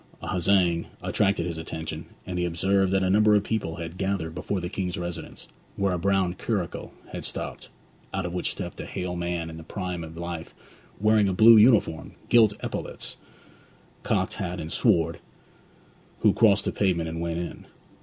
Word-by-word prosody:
A - - -6
huzzaing 90 -2 +2 0.2
attracted 95 -4 +1
his 85 -2 -4
attention, 80 0 -6 0.2
and 90 -1 -3
he - - +1
observed 95 +3 +2
that 95 0 +2
a 95 - +2
number 105 +1 +5
of 100 - +3
people 100 -7 -2
had 85 +2 -7
gathered 95 -4 -1
before 95 +3 -2
the 90 - -3
King's 90 -2 -3
residence, 85 0 -6 0.3
where 100 -2 +1
a 90 - -1
brown 95 -1 +2
curricle 95 -3 -3 0.2
had - - -5
stopped, - - -5 0.4
out 95 -2 -2
of 90 - -4
which 90 - -1
stepped - - -6
a - - -7
hale 90 -1 -4
man 85 -1 -2
in 80 0 -8
the 80 - -9
prime 90 -2 -4
of 80 0 -9
life, 85 -1 -6 0.4
wearing 105 -1 +4
a - - 0
blue 115 +4 +8
uniform, 105 -7 +4 0.2
gilt 110 -3 +6
epaulettes, - - -5 0.8
cocked - - 0
hat, 90 -1 -4
and 80 0 -5
sword, 85 0 +2 1.0
who - - +5
crossed 100 -3 +4
the - - 0
pavement 90 -5 +1
and 80 +1 -4
went 85 -1 -2
in. 85 0 -6
90 Hz, 180 wpm, -26 LUFS, 85-100 Hz, 1.0 s, blue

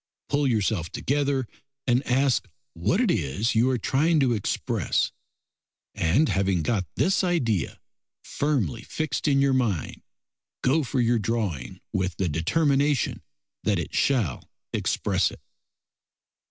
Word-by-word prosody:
Pull 145 0 +2
yourself 105 -7 0
together, 140 -2 0 0.4
and 125 0 +3
ask 130 +1 +2 0.3
what 185 - 0
it 240 -7 +3
is 95 - 0
you 115 +3 +3
are 130 - +1
trying 150 +8 +2
to 130 -4 +3
express, 105 -3 0 0.8
and 115 - +2
having 95 -6 +1
got 95 -2 0
this 190 +1 +2
idea 120 - 0 0.4
firmly 140 - -1
fixed 155 0 -3
in 140 -2 +4
your 135 -1 +3
mind, 115 - -1 0.6
go 150 +5 +3
for 130 0 -2
your 120 -1 +3
drawing 105 - -2
with 95 -2 -1
the 95 - 0
determination 140 - +1 0.4
that - - +2
it - - -4
shall 115 - 0 0.2
express - - +1
it. - - -12
125 Hz, 125 wpm, -26 LUFS, 100-140 Hz, 0.8 s, in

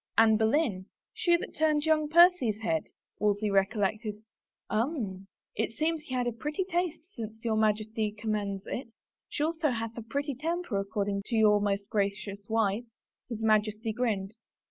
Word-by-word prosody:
" - - -47
Anne 225 -1 +6
Boleyn 220 - +1
— - - -64
she 345 -1 +3
that - - -7
turned 305 -1 +2
young 310 -1 +2
Percy's 330 - +5
head?" 160 -7 0 0.3
Wolsey 210 0 +1
recollected. 205 +2 +1 0.5
"Um 215 - -2
— - - -59
it 225 +1 -1
seems 315 +4 0
he 260 - -4
had 250 -1 +1
a 240 - 0
pretty 300 - -2
taste 350 -1 -2
since 220 0 -7
your 225 -1 +2
Majesty 215 0 +1
conunends 210 -2 -2
it. 260 - -4 0.4
She 290 - -2
also 320 -1 +1
hath 230 -2 -3
a 235 - -5
pretty 280 +5 -2
temper 325 - -2
according 200 0 -1
to 235 - -1
your 210 -2 +5
most 200 -1 0
gracious 200 0 -2
wife.^' 220 +1 +1 0.4
His 225 -2 -4
Majesty 215 0 +2
grinned. 215 -3 -1
220 Hz, 165 wpm, -29 LUFS, 205-290 Hz, 0.5 s, Anne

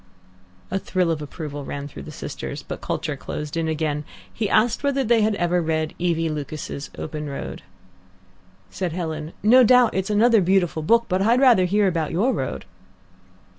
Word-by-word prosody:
A 195 - 0
thrill 185 -3 0
of 155 -2 -2
approval 145 -1 -6
ran 140 +1 -5
through 145 - -10
the - - -9
sisters. - - -6
But - - -7
culture 155 -1 -3
closed 150 +2 -6
in 165 -1 -1
again. 155 -2 -1 0.3
He 215 -3 -2
asked 230 +1 +2
whether 280 -1 +1
they 230 -1 +3
had 215 0 +2
ever 175 -1 +1
read 160 -1 -1
E. 175 -1 +1
V. 165 0 -1
Lucas's 150 -1 -5
OPEN 150 -1 -5
ROAD. 140 - -6 1.1
Said 180 -4 -3
Helen, 160 -3 -4
"No 250 +4 +7
doubt 250 0 +5
it's 190 +1 -1
another 220 +1 +4
beautiful 175 -3 +1
book, 230 +9 +3
but 185 0 0
I'd 230 +5 +4
rather 245 -9 +5
hear 200 +2 +2
about 165 -4 0
your 225 +10 +1
road." 135 - -4
175 Hz, 175 wpm, -23 LUFS, 155-215 Hz, 1.1 s, No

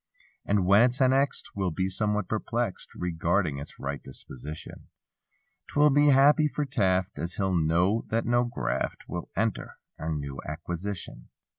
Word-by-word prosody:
And 100 -2 +2
when 100 +3 +6
it's 125 +1 +3
annexed. 135 +2 +2
We'll 95 -2 0
be 95 +3 -1
somewhat 105 0 -1
perplexed 115 -1 -2
Regarding 85 -2 0
its 70 - -10
right 70 +1 -4
disposition; 70 +3 -9 0.8
'Twill 150 0 +4
be 145 +2 +4
happy 145 +2 +6
for 150 0 -2
Taft 95 - 0
As 85 +3 -3
he'll 95 -2 0
know 85 +6 +2
that 115 +1 0
no 120 +1 +2
graft 120 0 -3
Will 85 - -5
enter 115 -2 -2 0.2
our 80 +1 -3
new 70 -3 -4
acquisition. 85 -4 -5
95 Hz, 145 wpm, -27 LUFS, 80-120 Hz, 0.8 s, when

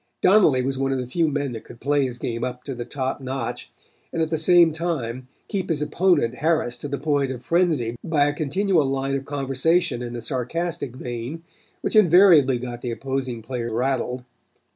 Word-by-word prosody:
Donnelly 175 -11 +5
was 135 0 -2
one 135 0 0
of 135 - 0
the 125 - -3
few 160 +7 0
men 145 -2 -1
that 115 -2 -7
could 115 - -13
play 145 -1 +1
his 125 -1 -7
game 115 -1 -3
up 125 0 -4
to 135 - -5
the 120 -1 -6
top 130 +1 -3
notch 130 -2 -4 0.4
and - - -3
at 160 0 0
the 160 - +1
same 170 -1 +5
time 130 -7 -3 0.2
keep 195 -3 -3
his 160 -3 0
opponent 150 -5 +1
harassed 150 -6 0
to - - -4
the 140 0 -3
point 145 -2 0
of 125 -2 -8
frenzy 160 -10 +1
by 155 -3 +2
a 145 - +1
continual 160 +3 +1
line 135 0 -1
of 135 0 -2
conversation 140 0 0
in 120 0 -5
a 120 - -5
sarcastic 140 +2 -3
vein 125 +6 -6 0.4
which - - -2
invariably 175 - +6
got 120 0 -6
the 125 - -3
opposing 130 -1 -3
player 120 0 -4
rattled. 125 +1 -1
135 Hz, 195 wpm, -23 LUFS, 125-160 Hz, 0.4 s, invariably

